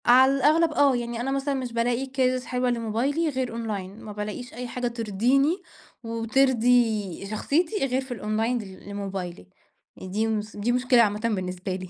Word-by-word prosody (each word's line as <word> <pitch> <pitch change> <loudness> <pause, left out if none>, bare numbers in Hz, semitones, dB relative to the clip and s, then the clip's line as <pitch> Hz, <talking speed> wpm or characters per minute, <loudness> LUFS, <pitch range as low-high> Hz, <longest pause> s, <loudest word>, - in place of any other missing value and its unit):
على 255 +2 +7
الأغلب 310 +4 +4
آه، 280 -3 +4
يعني 235 -1 -3
أنا 270 +2 -1
مثلًا 275 +1 0
مش 255 -3 -3
بالاقي 240 +2 0
cases 255 -1 0
حلوة 250 0 0
لموبايلي 240 +8 0
غير 260 -3 -2
أونلاين، 215 -3 -5
ما 215 - -7
بالاقيش 210 +4 -6
أي 245 +2 -5
حاجة 250 0 -2
ترضيني 240 - +1 0.4
وترضي 230 -4 +2
شخصيتي 315 - 0
غير 260 0 0
في 260 -1 -10
الأونلاين 225 +2 -1
ل 195 -2 -10
لموبايلي، 190 - -5 0.5
يعني 185 - -9
دي 215 +3 +1
مس 215 -1 -3
دي 210 +4 0
مشكلة 250 0 +4
عامةً 210 -2 +2
بالنسبة 185 -4 -2
لي 185 -1 -7
235 Hz, 165 wpm, -26 LUFS, 210-260 Hz, 0.5 s, على